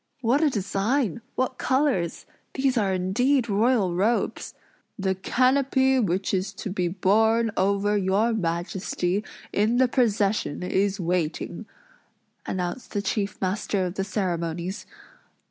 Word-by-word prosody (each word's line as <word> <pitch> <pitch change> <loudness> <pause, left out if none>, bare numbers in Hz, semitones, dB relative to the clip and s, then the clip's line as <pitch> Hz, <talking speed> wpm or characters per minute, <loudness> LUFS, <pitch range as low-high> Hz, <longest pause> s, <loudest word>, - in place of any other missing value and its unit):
"What 255 +5 +2
a 310 - +4
design! 210 - -1
What 255 0 -1
colors! 260 - 0 0.3
These 265 -1 +1
are 205 -5 +1
indeed 235 +8 +1
royal 210 -2 +2
robes!" 210 +7 0 0.4
"The 190 -2 0
canopy 265 +5 +2
which 190 -3 0
is 190 +1 0
to 195 0 -6
be 180 -2 0
borne 220 +5 +2
over 200 +2 +1
your 205 +4 +2
Majesty, 180 +1 -1 0.3
in 215 +4 +2
the 260 0 +5
procession, 210 - +1
is 195 +2 0
waiting," 170 -2 -2 0.8
announced 185 +6 -4
the 205 -2 -1
chief 200 0 -2
master 195 0 -1
of 180 - -3
the 195 - -2
ceremonies. 180 -1 -3
200 Hz, 125 wpm, -25 LUFS, 185-235 Hz, 0.8 s, the